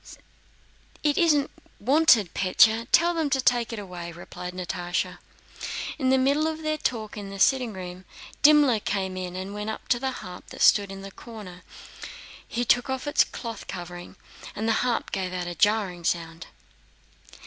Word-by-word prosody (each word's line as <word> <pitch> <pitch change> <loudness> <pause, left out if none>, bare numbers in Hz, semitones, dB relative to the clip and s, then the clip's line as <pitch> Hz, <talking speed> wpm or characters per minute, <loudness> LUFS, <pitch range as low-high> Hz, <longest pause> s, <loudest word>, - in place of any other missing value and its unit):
"It 295 -1 +3
isn't 300 -5 +3 0.3
wanted, 245 - +4
Pólya. 220 +4 +4
Tell 345 +1 +5
them 320 -3 0
to 270 -1 +1
take 245 -2 +2
it 230 - -5
away," 180 -4 -7
replied 180 +1 -8
Natásha. 175 0 -3 0.8
In 260 -2 +1
the 265 - +5
middle 280 +4 +2
of 320 0 -4
their 310 0 -1
talk 220 -6 -2
in 200 -1 -6
the 195 - -7
sitting 250 +3 +3
room, 185 -1 -8 0.4
Dimmler 290 -6 +6
came 190 -2 -2
in 180 -1 -5
and 190 +2 -5
went 210 +1 -4
up 220 - -6
to 240 - +3
the 265 +1 -1 0.2
harp 180 0 -10
that - - -3
stood 200 -2 +5
there 195 - -7
in 195 - -9
a 195 - -8
corner. 205 -6 -11 0.9
He 240 +1 -2
took 245 +3 +3
off 265 +1 -3
its 290 - +4
cloth 230 -2 -7
covering, 175 -1 -8 0.4
and 220 +2 -2
the 225 - +3
harp 245 -2 -1
gave 185 -1 -2
out 180 -1 -3
a 175 - -4
jarring 195 -2 +1
sound. 165 0 -2
210 Hz, 175 wpm, -26 LUFS, 185-260 Hz, 0.9 s, Dimmler